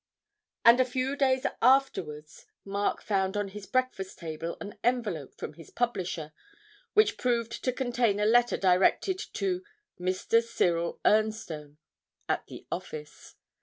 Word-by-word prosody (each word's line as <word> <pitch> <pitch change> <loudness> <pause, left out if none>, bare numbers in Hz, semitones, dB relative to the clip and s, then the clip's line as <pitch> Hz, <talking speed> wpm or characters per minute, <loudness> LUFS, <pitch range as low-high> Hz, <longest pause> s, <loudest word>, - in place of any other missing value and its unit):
And 235 +2 +8
a - - +7
few 255 +2 -2
days 260 -2 +2 0.2
afterwards 175 - +1 0.2
Mark 200 +1 -1
found 195 -1 0
on 205 -1 -1
his 200 0 -9
breakfast 255 -5 -1
table 165 0 -5
an 205 - -8
envelope 220 - -1
from - - -6
his 165 0 -13
publisher, 185 -10 -2 0.6
which 420 -1 +4
proved 235 -2 -1
to 255 - +2
contain 240 -5 +1
a 210 - +2
letter 240 +2 +4
directed 195 - +3
to 370 -1 -1 0.4
'Mr. 185 +5 +2
Ciril 175 -7 0
Ernstone,' 190 -9 +1 0.5
at - - -1
the - - -10
office. 150 -1 -7
210 Hz, 130 wpm, -29 LUFS, 180-250 Hz, 0.6 s, And